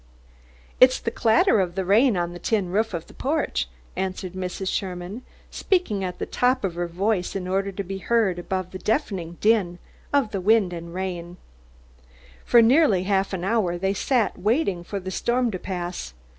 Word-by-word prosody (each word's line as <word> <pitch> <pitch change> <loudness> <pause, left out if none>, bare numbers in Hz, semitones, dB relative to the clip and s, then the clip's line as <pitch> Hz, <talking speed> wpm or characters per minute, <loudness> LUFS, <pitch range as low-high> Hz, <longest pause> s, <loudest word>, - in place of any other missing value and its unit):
"It's 255 0 +6
the 230 - -3
clatter 235 - +3
of 180 -2 -1
the 190 -1 -1
rain 215 +3 +4
on 175 0 -2
the 175 - -8
tin 205 -4 0
roof 215 0 0
of 165 - -5
the - - -16
porch," 310 +4 -1 0.3
answered 185 -1 -3
Mrs. 185 +1 -4
Sherman, 185 +3 -4 0.3
speaking 300 - 0
at 180 -1 -4
the - - -3
top 250 0 +1
of 190 -3 -1
her 175 +1 -2
voice 185 +2 -1
in 185 -2 -3
order 195 +1 0
to 200 +1 -4
be 195 +1 -5
heard 195 -3 +1
above 185 0 -3
the 185 - -7
deafening 190 - -2
din 205 -5 +2 0.3
of 275 -7 +2
the 195 - -2
rain 205 -1 +3
and 170 0 -7
wind. 180 -1 -5 1.1
For 235 -1 +6
nearly 235 - +4
half 195 0 +1
an 185 -3 -3
hour 190 -4 +1
they 190 +2 0
sat 235 -1 0
waiting 200 - +1
for 200 +3 -4
the 190 0 -6
storm 240 +4 0
to 185 - -4
pass. 175 - -5
195 Hz, 185 wpm, -24 LUFS, 180-225 Hz, 1.1 s, It's